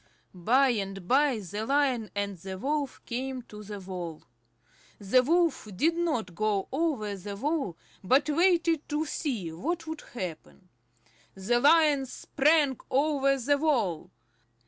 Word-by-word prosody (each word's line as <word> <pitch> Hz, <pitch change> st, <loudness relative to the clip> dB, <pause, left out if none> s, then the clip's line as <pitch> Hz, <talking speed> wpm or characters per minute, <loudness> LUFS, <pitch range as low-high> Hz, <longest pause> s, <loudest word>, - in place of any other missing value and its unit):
By 250 Hz, +10 st, +3 dB
and 195 Hz, -5 st, -3 dB
by 275 Hz, +1 st, +3 dB
the 205 Hz, +1 st, -5 dB
Lion 260 Hz, -3 st, +1 dB
and 200 Hz, -1 st, -2 dB
the 190 Hz, +2 st, -6 dB
Wolf 285 Hz, +4 st, -2 dB
came 255 Hz, +1 st, -4 dB
to 210 Hz, -2 st, -11 dB
the 205 Hz, 0 st, -7 dB
wall. 180 Hz, -4 st, -7 dB, 0.7 s
The 205 Hz, +5 st, +3 dB
Wolf 335 Hz, -2 st, +1 dB
did 325 Hz, -, +2 dB
not 300 Hz, -, -1 dB
go 205 Hz, +1 st, 0 dB
over 265 Hz, -9 st, -1 dB
the 200 Hz, +1 st, -7 dB
wall 280 Hz, -, -2 dB, 0.3 s
but 260 Hz, +10 st, +3 dB
waited 335 Hz, 0 st, +2 dB
to 300 Hz, +1 st, -1 dB
see 240 Hz, -, -3 dB
what 325 Hz, -, -3 dB
would 320 Hz, -1 st, -6 dB
happen. 180 Hz, -2 st, -7 dB, 0.7 s
The 210 Hz, +6 st, +1 dB
Lion 290 Hz, -1 st, +4 dB
sprang 290 Hz, 0 st, +2 dB
over 275 Hz, 0 st, +2 dB
the 280 Hz, +3 st, +1 dB
wall. 230 Hz, -, 0 dB
255 Hz, 135 wpm, -28 LUFS, 200-295 Hz, 0.7 s, Lion